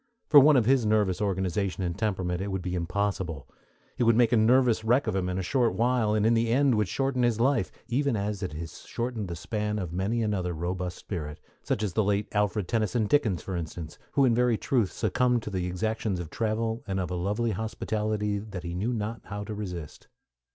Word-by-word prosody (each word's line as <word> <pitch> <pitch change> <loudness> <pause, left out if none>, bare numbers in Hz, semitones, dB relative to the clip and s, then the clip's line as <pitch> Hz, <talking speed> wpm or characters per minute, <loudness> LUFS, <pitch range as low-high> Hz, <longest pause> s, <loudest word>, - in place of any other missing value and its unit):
For 145 - +9
one 145 +1 +7
of 120 - +3
his 130 0 +4
nervous 105 -3 +1
organization 95 -1 -1
and 85 -1 -2
temperament 95 -4 -1
it 100 - -3
would 95 -2 -3
be 90 0 -3
impossible. 90 -3 -2 0.5
It - - +3
would 115 0 +5
make 120 -1 +4
a - - +4
nervous 120 +1 +4
wreck 120 +5 +3
of - - -1
him 90 -1 0
in 90 - -2
a 95 - -1
short 120 +5 +1
while, 115 -3 +2
and 105 0 +2
in 115 - +4
the 115 0 +2
end 135 +2 +3
would 105 -3 +1
shorten 135 +5 0
his 120 -2 +2
life, 130 +1 +2 0.2
even 135 +1 +1
as 100 -1 -2
it 90 -5 -3
has 80 +1 -7
shortened 115 -4 -3
the 85 - -5
span 105 +4 -2
of 90 -5 -4
many 105 +6 0
another 95 -5 -1
robust 90 +2 -3
spirit; 75 -6 -6 0.2
such 110 - -1
as 100 -4 -2
the 110 - +2
late 100 +1 0
Alfred 105 -2 0
Tennyson 110 0 0
Dickens, 105 - +1
for 95 - -4
instance, 80 -1 -6
who 140 - +4
in 120 - +4
very 120 -1 +3
truth 115 -6 +1
succumbed 120 +2 +1
to 105 - -5
the 90 -2 -2
exactions 105 +1 -2
of 85 -1 -6
travel 110 +1 -1
and 95 -1 -1
of 90 -1 -3
a - - -1
lovely 105 +6 0
hospitality 105 0 -2
that 100 -4 -7
he 85 -1 -4
knew 105 +8 -1
not 110 0 -3
how 105 0 -5
to 105 +1 -6
resist. 90 -7 -7
105 Hz, 220 wpm, -27 LUFS, 90-115 Hz, 0.5 s, For